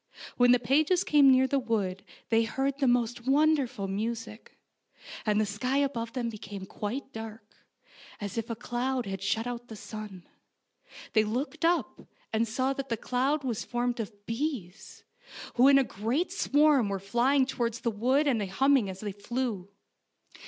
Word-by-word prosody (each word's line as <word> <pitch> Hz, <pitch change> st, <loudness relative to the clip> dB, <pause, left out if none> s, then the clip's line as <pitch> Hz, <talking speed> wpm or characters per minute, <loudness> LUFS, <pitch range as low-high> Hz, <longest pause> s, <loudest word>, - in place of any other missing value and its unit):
When 245 Hz, 0 st, +5 dB
the 250 Hz, -, +7 dB
pages 300 Hz, +9 st, +2 dB
came 290 Hz, -2 st, +6 dB
near 260 Hz, 0 st, +5 dB
the 275 Hz, +1 st, +1 dB
wood 205 Hz, -6 st, -2 dB, 0.3 s
they 225 Hz, 0 st, +4 dB
heard 270 Hz, +5 st, -2 dB
the 275 Hz, -, +2 dB
most 240 Hz, 0 st, +1 dB
wonderful 275 Hz, -7 st, +2 dB
music, 220 Hz, +2 st, -5 dB, 0.7 s
and 210 Hz, 0 st, +3 dB
the 215 Hz, -, +2 dB
sky 230 Hz, +7 st, -1 dB
above 240 Hz, -5 st, -1 dB
them 250 Hz, -3 st, -2 dB
became 205 Hz, -3 st, -7 dB
quite 245 Hz, +8 st, -5 dB
dark, 220 Hz, -1 st, -8 dB, 0.7 s
as 205 Hz, -3 st, -5 dB
if 230 Hz, 0 st, -3 dB
a 230 Hz, -, -2 dB
cloud 245 Hz, +2 st, -2 dB
had 195 Hz, -1 st, -5 dB
shut 205 Hz, +4 st, 0 dB
out 240 Hz, 0 st, -5 dB
the 220 Hz, -, -9 dB
sun. 205 Hz, -3 st, -9 dB, 0.9 s
They 215 Hz, -, +5 dB
looked 260 Hz, +9 st, -3 dB
up, 340 Hz, +1 st, +1 dB, 0.3 s
and 225 Hz, +1 st, +2 dB
saw 255 Hz, +5 st, 0 dB
that 275 Hz, 0 st, -5 dB
the 230 Hz, -, -1 dB
cloud 265 Hz, +6 st, 0 dB
was 240 Hz, -4 st, -2 dB
formed 245 Hz, 0 st, -2 dB
of 205 Hz, -2 st, -7 dB
bees, 230 Hz, -, -4 dB, 0.5 s
who 250 Hz, +2 st, +5 dB
in 275 Hz, 0 st, +7 dB
a 275 Hz, -, +5 dB
great 240 Hz, -, -2 dB
swarm 290 Hz, -, +3 dB
were 200 Hz, -, -1 dB
flying 240 Hz, +8 st, +2 dB
towards 235 Hz, -3 st, -2 dB
the 235 Hz, -, 0 dB
wood 255 Hz, +8 st, +2 dB
and 250 Hz, -7 st, +2 dB
hum 270 Hz, +9 st, +3 dB
ming 235 Hz, -8 st, +3 dB
as 190 Hz, 0 st, -7 dB
they 210 Hz, -1 st, -3 dB
flew. 205 Hz, -1 st, -3 dB
240 Hz, 170 wpm, -29 LUFS, 215-270 Hz, 0.9 s, the